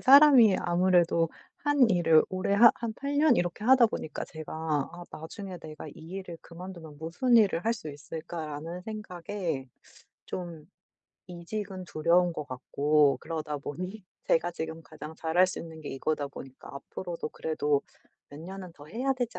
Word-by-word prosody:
사람이 265 Hz, -6 st, +8 dB
아무래도 175 Hz, -2 st, +3 dB, 0.3 s
1 290 Hz, -4 st, +4 dB
일을 165 Hz, -5 st, +5 dB
오래 185 Hz, +1 st, 0 dB
한 230 Hz, +3 st, +9 dB
한 230 Hz, -2 st, -4 dB
8 280 Hz, +3 st, -3 dB
년 295 Hz, -4 st, +5 dB
이렇게 175 Hz, +3 st, -1 dB
하다 255 Hz, -1 st, +7 dB
보니까 160 Hz, -7 st, -5 dB
제가 155 Hz, -1 st, -9 dB, 0.4 s
'아 175 Hz, 0 st, -9 dB
나중에 180 Hz, +4 st, -7 dB
내가 155 Hz, -2 st, -9 dB
이 -, -, -9 dB, 0.2 s
일을 185 Hz, -3 st, -6 dB
그만두면 170 Hz, -3 st, -10 dB
무슨 180 Hz, -, +2 dB
일을 200 Hz, -6 st, +4 dB
할 225 Hz, -, +3 dB
수 210 Hz, -9 st, -7 dB
있을까?'라는 160 Hz, +2 st, -6 dB
생각에 180 Hz, -8 st, -4 dB, 0.6 s
좀 170 Hz, -4 st, -6 dB, 0.6 s
이직은 185 Hz, +2 st, -5 dB
두려운 170 Hz, +2 st, +3 dB
것 150 Hz, -, -5 dB
같고 140 Hz, +2 st, +2 dB
그러다 155 Hz, -2 st, -3 dB
보니 185 Hz, +9 st, -6 dB, 0.2 s
제가 170 Hz, +2 st, +3 dB
지금 160 Hz, -1 st, -5 dB
가장 160 Hz, -1 st, -9 dB
잘할 165 Hz, +3 st, +3 dB
수 185 Hz, -, -4 dB
있는 160 Hz, -1 st, -8 dB
게 150 Hz, -, -7 dB
이거다 145 Hz, +2 st, -1 dB
보니까 135 Hz, -1 st, -11 dB
'앞으로도 170 Hz, +4 st, -6 dB
그래도 150 Hz, -3 st, 0 dB, 0.5 s
몇 145 Hz, -, -11 dB
년은 185 Hz, +2 st, -8 dB
더 145 Hz, -, -13 dB
해야 255 Hz, -, -1 dB
되지 245 Hz, -2 st, -3 dB
175 Hz, 305 characters per minute, -29 LUFS, 155-200 Hz, 0.6 s, 한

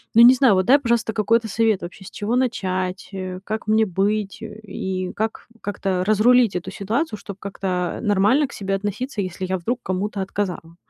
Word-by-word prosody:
Ну, 230 Hz, -, +8 dB
не 245 Hz, -, +10 dB
знаю, 255 Hz, -5 st, +5 dB
вот 185 Hz, -, +2 dB
дай, 275 Hz, +7 st, +6 dB
пожалуйста, 235 Hz, -3 st, 0 dB
какой-то 225 Hz, +2 st, +2 dB
совет 220 Hz, -1 st, +1 dB
вообще, 185 Hz, +2 st, -9 dB
с -, -, -10 dB
чего 215 Hz, +4 st, -2 dB
начать, 185 Hz, -7 st, -1 dB
э, 185 Hz, -1 st, -5 dB
как 215 Hz, +1 st, -4 dB
мне 220 Hz, 0 st, +4 dB
быть 200 Hz, +2 st, -1 dB
и 190 Hz, -4 st, -5 dB
как 220 Hz, +1 st, -3 dB
как-то 195 Hz, -2 st, -1 dB
разрулить 220 Hz, +1 st, +4 dB
эту 180 Hz, +1 st, -4 dB
ситуацию, 215 Hz, -, -2 dB
чтоб 200 Hz, -2 st, -8 dB
как-то, 185 Hz, -2 st, -3 dB
э, -, -, -7 dB
нормально 210 Hz, +7 st, +3 dB
к -, -, -13 dB
себе 195 Hz, -1 st, -2 dB
относиться, 205 Hz, +4 st, -3 dB
если 185 Hz, 0 st, -4 dB
я 190 Hz, 0 st, -1 dB
вдруг 240 Hz, +9 st, -2 dB
кому-то 195 Hz, +2 st, -2 dB
отказала. 185 Hz, -4 st, -4 dB
205 Hz, 185 wpm, -22 LUFS, 185-225 Hz, -, не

